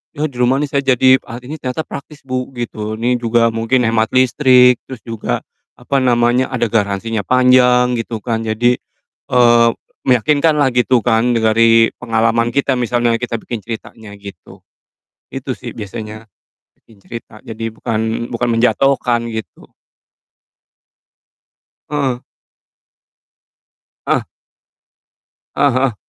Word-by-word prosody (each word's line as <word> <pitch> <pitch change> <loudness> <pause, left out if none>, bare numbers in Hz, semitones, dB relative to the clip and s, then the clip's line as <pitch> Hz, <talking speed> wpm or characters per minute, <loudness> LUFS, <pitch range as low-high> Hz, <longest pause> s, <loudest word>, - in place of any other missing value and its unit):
“Ya. 150 - -3
di 125 - -11
rumah 125 +1 +3
nih - - -2
saya 140 - +1
jadi 130 0 +4
alat 120 +2 -8
ini 150 - -5
ternyata 130 +4 -3
praktis, 145 +1 -9
Bu,” 130 0 -4
gitu. 110 -3 -5
“Ini 125 +1 +1
juga 115 0 +2
mungkin 115 +3 0
hemat 110 0 +1
listrik, 125 -1 +5
terus 130 -3 -8
juga, 115 - -3 0.4
apa 140 +3 -1
namanya, 120 +1 +2
ada 120 -2 0
garansinya 105 0 -1
panjang,” 125 0 +4
gitu 115 -1 -4
kan. 115 -2 -2
Jadi, 115 +3 +1 0.6
eee, 120 -1 +5 0.4
meyakinkanlah 145 +3 +3
gitu 125 0 +3
kan 120 +1 +2
dengari 115 0 +4
pengalaman 115 0 0
kita 135 -1 +1
misalnya 120 -1 +1
kita 115 -2 -4
bikin 120 - -5
ceritanya 110 -2 -8
gitu. 100 -1 -13 0.7
Itu - - -5
sih - - -8
biasanya, 110 +1 -8 0.6
bikin 110 -3 -22
cerita. 115 -2 -10
Jadi 115 0 -5
bukan 110 +1 -3
bukan 120 +1 -1
menjatuhkan 125 -1 +1
gitu. 110 -1 -8 2.2
Heeh. 135 -4 -2 1.8
Ah! - - +1 1.3
Ah 140 -2 +2
heeh. 130 -3 0
120 Hz, 120 wpm, -16 LUFS, 115-125 Hz, 2.2 s, listrik